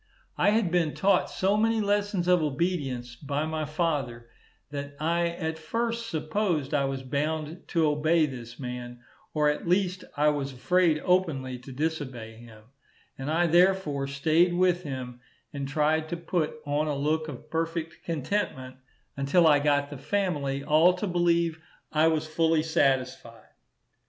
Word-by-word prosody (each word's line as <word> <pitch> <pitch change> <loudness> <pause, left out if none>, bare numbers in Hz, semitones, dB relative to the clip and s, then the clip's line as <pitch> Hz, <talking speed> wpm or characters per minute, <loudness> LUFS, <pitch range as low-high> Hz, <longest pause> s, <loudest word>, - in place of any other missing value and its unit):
I - - +3
had 210 -4 +2
been 170 -4 +1
taught 200 +1 +2
so 195 +2 +1
many 225 +1 +2
lessons 205 -3 0
of 180 -1 +4
obedience 135 -5 -2
by 145 +2 -2
my 155 -1 -2
father, 140 -7 -2 0.4
that 140 0 -6
I 170 +2 +1
at 160 -2 -4
first 230 +7 -2
supposed 155 -2 -1
I 140 -2 +2
was 135 -1 -3
bound 155 +5 -3
to 165 -2 +2
obey 155 +2 +3
this 120 -4 -8
man, 125 -1 -6 0.3
or 150 -1 +3
at 150 +3 -1
least 185 0 +1
I 150 +1 +4
was 140 -2 -2
afraid 165 +5 +2
openly 145 -9 +1
to 125 +2 -11
disobey 130 -6 -4
him; 110 -2 -14 0.5
and 135 +2 -5
I 165 +3 +2
therefore 175 -5 +3
staid 160 +6 +2
with 180 -1 +2
him, 130 -5 -6 0.3
and 140 -1 -4
tried 155 +2 +1
to 175 - -3
put 170 -2 -1
on 145 +2 0
a 150 - -1
look 155 +3 0
of 140 -5 -9
perfect 165 0 -3
contentment 145 -5 -3 0.4
until 140 +6 +3
I 150 -2 +6
got 145 0 +1
the 145 - -7
family 145 -9 -1
all 160 +5 +5
to 180 +3 -3
believe 170 -3 +1 0.3
I 155 +1 +4
was 160 -1 +1
fully 160 0 +1
satisfied. 130 -7 -1
155 Hz, 155 wpm, -27 LUFS, 140-175 Hz, 0.5 s, I